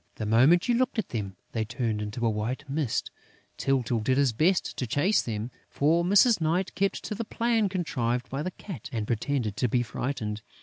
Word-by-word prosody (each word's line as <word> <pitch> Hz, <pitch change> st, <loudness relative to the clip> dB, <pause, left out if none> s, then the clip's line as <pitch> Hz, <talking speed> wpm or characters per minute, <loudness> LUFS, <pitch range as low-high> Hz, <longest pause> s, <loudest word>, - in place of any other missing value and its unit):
The 110 Hz, -, -4 dB
moment 130 Hz, +11 st, +5 dB
you 245 Hz, -, +3 dB
looked 255 Hz, +1 st, +1 dB
at 220 Hz, -, -1 dB
them, 100 Hz, -5 st, -4 dB, 0.2 s
they 110 Hz, -, -1 dB
turned 115 Hz, -1 st, -2 dB
into 105 Hz, +3 st, -3 dB
a -, -, +4 dB
white 115 Hz, +7 st, -3 dB
mist. 140 Hz, -4 st, -1 dB, 0.5 s
Tyltyl 125 Hz, -4 st, +1 dB
did 130 Hz, +4 st, +1 dB
his 140 Hz, -4 st, +3 dB
best 170 Hz, -, +1 dB
to 125 Hz, -, -2 dB
chase 170 Hz, -, +2 dB
them; 110 Hz, +1 st, -4 dB, 0.2 s
for 160 Hz, +4 st, +2 dB
Mrs. 205 Hz, +3 st, +5 dB
Night 170 Hz, +4 st, 0 dB
kept 195 Hz, 0 st, -1 dB
to -, -, -4 dB
the 225 Hz, +3 st, -3 dB
plan 230 Hz, -1 st, +1 dB
contrived 125 Hz, -10 st, -1 dB
by 135 Hz, +2 st, -3 dB
the 185 Hz, -, -2 dB
Cat 180 Hz, -, -9 dB
and 110 Hz, -3 st, -2 dB
pretended 115 Hz, -1 st, -1 dB
to 125 Hz, -, +2 dB
be 120 Hz, +2 st, +2 dB
frightened. 110 Hz, -4 st, -3 dB
130 Hz, 200 wpm, -27 LUFS, 115-175 Hz, 0.5 s, moment